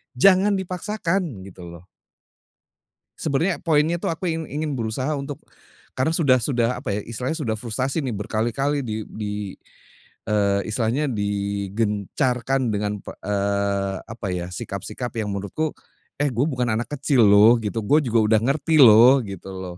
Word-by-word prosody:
jangan 195 +8 +5
dipaksakan 190 0 -2 0.2
gitu, 90 -2 -11
loh. 85 +1 -12 1.3
Sebenarnya 160 +5 0
poinnya 160 +1 +2
tuh - - -2
aku 165 +2 -4
ingin 160 0 -3
ingin 150 +1 -3
berusaha 120 +6 -2
untuk, 140 +1 -6 0.5
karena 130 +5 0
sudah 130 -6 +4
sudah 120 -1 +1
apa 105 -7 -2
ya - - -2
istilahnya, 125 +6 -3
sudah 115 -9 -2
frustasi 130 +6 -2
nih 130 -6 -3
berkali-kali 120 +8 -1
di 110 -4 -4
di, 105 -1 -5 0.9
eee, 100 -1 +1
istilahnya 115 +6 0
digencarkan 105 +5 -1
dengan 105 0 -2
p - - -8
eee, 100 -1 -1
apa 110 -1 -7
ya 90 -1 -3
sikap-sikap 120 +6 -5
yang 105 -2 -2
menurutku, 100 +11 -3 0.4
eh, 145 0 +1
gue 120 +5 +1
bukan 125 -5 -1
anak 115 +2 -2
kecil 135 -2 +2
loh, 105 +4 +6
gitu. 110 0 -3
Gue 150 +9 +4
juga 120 -5 +1
udah 110 - +5
ngerti 145 +4 +2
loh, 125 +3 +8
gitu 95 -3 -8
loh. 95 -2 -7
115 Hz, 150 wpm, -23 LUFS, 105-145 Hz, 1.3 s, loh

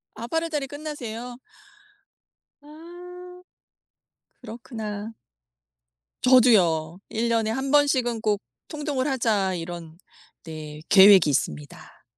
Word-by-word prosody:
아 235 - -7
8 325 +5 -1
월달에 300 -4 -3
끝나세요? 250 -5 -7 1.2
아. 355 +4 -13 1.0
그렇구나. 220 -2 -7 1.1
저도요. 185 -10 +4
'1 230 +1 -2
년에 225 -1 +1
1 265 +3 -3
번씩은 255 -6 +2
꼭 210 -2 0 0.3
통독을 295 -3 -3
하자.' 215 -8 0
이런 170 -1 -8 0.5
네 155 -2 -9
계획이 190 -5 +7
있습니다. 75 - -4
235 Hz, 180 characters per minute, -24 LUFS, 190-290 Hz, 1.2 s, 계획이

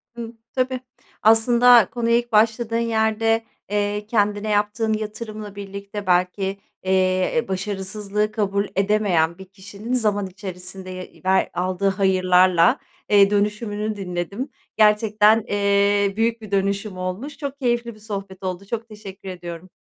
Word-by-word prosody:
Hıı, 235 -1 -7 0.2
tabii. 255 0 0 0.4
Aslında, 235 0 +6
konuya 235 0 +1
ilk 240 0 -3
başladığın 225 +1 +2
yerde, 225 0 +1 0.3
eee, 205 0 -1
kendine 210 -1 0
yaptığın 210 +2 +1
yatırımla 215 -1 -6
birlikte 200 0 -7
belki, 185 +2 +1 0.3
eee, 185 +4 +1
başarısızlığı 200 +2 -2
kabul 200 -2 0
edemeyen 195 -5 +2
bir 190 - -10
kişinin 200 +4 -7
zaman 210 -5 +1
içerisinde, 185 0 -8
ya 185 0 -6 0.3
ve - - +2
aldığı 185 +2 0
hayırlarla, 185 -2 +4 0.3
eee, 200 -1 +6
dönüşümünü 210 +1 -1
dinledim. 195 +7 -4 0.3
Gerçekten, 215 0 +4
eee, 200 0 +2
büyük 230 0 +1
bir 215 -2 -10
dönüşüm 200 0 -1
olmuş. 185 +11 -5
Çok 280 -2 -5
keyifli 240 -2 0
bir 215 - -17
sohbet 195 -3 -7
oldu, 185 +1 -4
çok 230 +2 -4
teşekkür 195 -3 -10
ediyorum. 175 0 -8
205 Hz, 125 wpm, -22 LUFS, 190-220 Hz, 0.4 s, Aslında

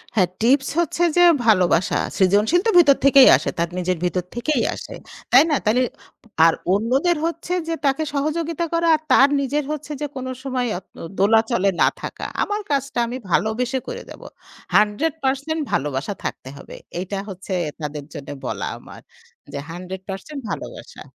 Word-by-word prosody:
হ্যাঁ, 185 -4 +4
টিপস 265 +4 +3
হচ্ছে 345 +1 0
যে 350 - +7 0.2
ভালোবাসা। 185 -4 +3 0.2
সৃজনশীল 205 - +3
তো - - +4
ভেতর 285 -6 +6
থেকেই 275 -1 +8
আসে - - -3
তার 170 0 0
নিজের 180 -1 -1
ভিতর 180 0 -1
থেকেই 245 +1 0
আসে, - - -9 0.4
তাই 260 +4 +8
না? - - +3
তাইলে 235 +4 +3 0.6
আর 165 - +5 0.2
অন্যদের 265 - +1
হচ্ছে 335 +1 -3
যে 330 - -1
তাকে 275 +3 +1
সহযোগিতা 325 +3 -1
করা 335 0 +1
আর 310 - -5
তার 275 +2 +6
নিজের 285 +2 -1
হচ্ছে 305 0 -5
যে 295 - -1
কোন 260 0 -5 0.2
সময় 255 -2 -1
আ - - -5
ত - - -38 0.2
দোলাচলে 220 0 +3
না - - +6
থাকা। - - -6 0.2
আমার 415 +1 -2
কাজটা 275 -3 -1
আমি 250 +2 -4
ভালোবেসে 245 +7 0
করে 485 0 -5
দেব। - - -11 0.5
১০০% 280 +6 +1
ভালোবাসা 145 +6 -1
থাকতে 130 - -5
হবে। - - -11 0.2
এইটা 190 +2 -4
হচ্ছে 190 0 -7 0.3
তাদের 150 -1 -5
জন্য 145 -3 -8 0.2
বলা - - -3
আমার - - -13 0.5
যে, 140 - -3
১০০% 190 - -7
ভালোবাসা। - - -7
250 Hz, 160 wpm, -21 LUFS, 190-300 Hz, 0.6 s, থেকেই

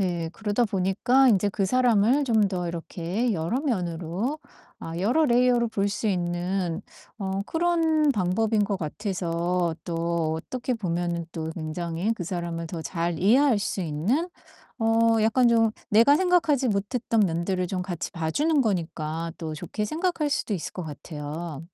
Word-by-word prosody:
네, 170 -3 -1
그러다 220 +2 0
보니까 205 +7 +3
인제 205 -2 +3
그 195 -1 0
사람을 245 +3 +3
좀 220 -5 +3
더 180 -2 -3
이렇게 175 +7 -2
여러 175 +10 -1
면으로 185 - -2 0.4
아 165 0 -6
여러 245 - +3
layer로 245 -1 +3
볼 205 -2 0
수 210 +2 -3
있는 175 -1 -1 0.4
어 195 0 -2
그런 325 -3 +2
방법인 210 +3 +1
것 200 -1 -1
같아서 175 -1 -1
또 170 -2 -1
어떻게 250 +9 -3
보면은 170 -4 -2
또 160 -1 -4
굉장히 170 +5 -2
그 200 - -6
사람을 170 -1 -4
더 170 -2 -5
잘 170 -1 -2
이해할 240 +5 +4
수 200 -1 -2
있는, 185 - 0 0.5
어 225 0 +3
약간 235 +3 +4
좀 225 -1 +4 0.2
내가 230 +7 +6
생각하지 320 -8 +2
못했던 220 +3 -1
면들을 180 0 0
좀 180 0 -3
같이 180 -3 -5
봐 160 -2 -2
주는 300 - +2
거니까 165 -4 -2
또 160 -2 -4
좋게 210 +7 -4
생각할 315 - -1
수도 215 -6 -1
있을 170 - -5
것 180 - -5
같아요. 150 +1 -6
195 Hz, 300 characters per minute, -26 LUFS, 170-235 Hz, 0.5 s, 내가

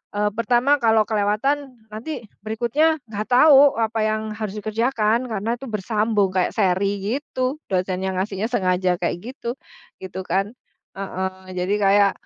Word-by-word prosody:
eee, 210 0 +1
pertama 245 +5 +2
kalau 220 -2 +4
kelewatan 245 +6 0 0.2
nanti 230 +3 -6 0.2
berikutnya 240 +9 +1
nggak 215 -1 -5
tahu 280 +1 +6
apa 225 0 0
yang 215 0 0
harus 215 -2 -5
dikerjakan 225 +2 0
karena 220 +2 -2
itu 270 - -8
bersambung 210 -1 0
kayak 185 -1 0
seri 195 0 +1 0.2
gitu, 260 0 -3
dosennya 185 0 -1
ngasihnya 195 +2 -2
sengaja 185 -5 +1
kayak 175 - -1 0.2
gitu, 235 -3 -4 0.5
gitu 190 0 -6
kan. 195 +6 -1 0.4
Heeh, 190 -1 -5
jadi 180 +3 -1
kayak, 200 0 +4
215 Hz, 135 wpm, -22 LUFS, 195-235 Hz, 0.5 s, tahu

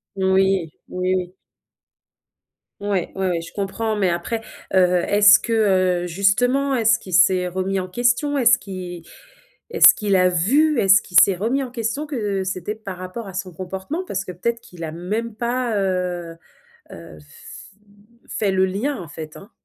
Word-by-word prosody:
Oui. 190 -2 +1 0.2
Oui, 185 +1 -1
oui. 180 -1 -4 1.5
Ouais, 200 -3 -2
ouais, 190 0 -1
ouais, 170 -2 -1
je 165 - -11
comprends, 215 +2 -2
mais 190 -4 +1
après, 175 +7 -3 0.3
heu, - - +5 0.3
est-ce 205 0 +6
que, - - -6
euh, 185 -5 +2
justement, 245 +10 +1
est-ce 230 -2 +3
qu'il 185 - -10
s'est 180 0 +4
remis 190 +2 -2
en 185 - -4
question? 245 +8 0
Est-ce 240 -2 +4
qu'il 180 -3 -8 0.7
est-ce 460 - +7
qu'il 205 -2 0
a 180 -1 +4
vu? 260 - +2
Est-ce 195 0 +5
qu'il 180 - -2
s'est 195 - +5
remis 235 +9 -1
en 250 - -7
question, 235 +4 -3
que 210 -9 -2
c'était 185 +2 -4
par 200 -4 -8
rapport 185 +5 -7
à 190 - -9
son 185 0 -5
comportement, 190 - -5
parce 195 - -3
que - - -6
peut-être 235 +7 -3
qu'il 175 -2 -12
a 160 - -4
même 210 +8 -4
pas, 240 0 -2
heu 180 -3 -2 0.6
heu, 85 -2 -12
f 75 0 -14 0.6
fait 205 -2 -1
le 190 0 +2
lien 220 +9 -2
en 175 - -9
fait, 155 +1 -9
hein. 200 - -13
195 Hz, 170 wpm, -21 LUFS, 180-225 Hz, 1.5 s, est-ce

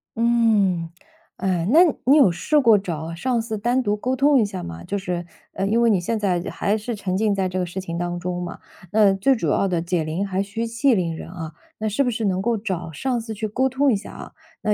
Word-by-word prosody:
嗯。 220 -7 +2 0.5
哎， 185 -2 -1
那 310 +8 +7 0.2
你 275 +4 +6
有 265 -11 +6
试 295 - +1
过 230 -6 +5
找 165 -3 -5
上 240 +8 -1
司 220 -2 -4
单 245 +4 +1
独 205 -2 +1
沟 250 +5 -2
通 280 +1 +4
一 220 - +3
下 195 -3 -6
吗？ 85 0 -8
就 200 - -3
是 180 -3 -3 0.3
呃， 195 - -1
因 220 +3 +2
为 235 - +4
你 195 - +3
现 225 +6 -1
在 190 -5 0
还 200 - 0
是 220 +2 -4
沉 195 -3 -3
浸 210 0 +1
在 190 -1 0
这 185 0 -3
个 180 - 0
事 175 +2 -5
情 170 -3 -5
当 175 0 -3
中 180 0 -3
嘛， 175 - -6 0.3
那 210 -2 +5
最 200 +8 +2
主 195 -9 -2
要 195 - +2
的， 180 -3 0
解 170 0 -1
铃 160 +6 -2
还 190 0 -1
需 205 +3 -3
系 235 +3 +2
铃 170 -4 -1
人 160 - -8
啊。 165 -3 -7 0.3
那 215 - -2
是 215 +6 +1
不 250 - 0
是 225 -2 -2
能 190 -1 0
够 230 +2 0
找 185 -6 -4
上 245 - -2
司 225 -1 -6
去 215 +1 -3
沟 260 +5 0
通 265 0 +2
一 - - +2
下 200 - -7
啊？ - - -10 0.3
那 210 - +2
200 Hz, 270 characters per minute, -22 LUFS, 180-230 Hz, 0.5 s, 那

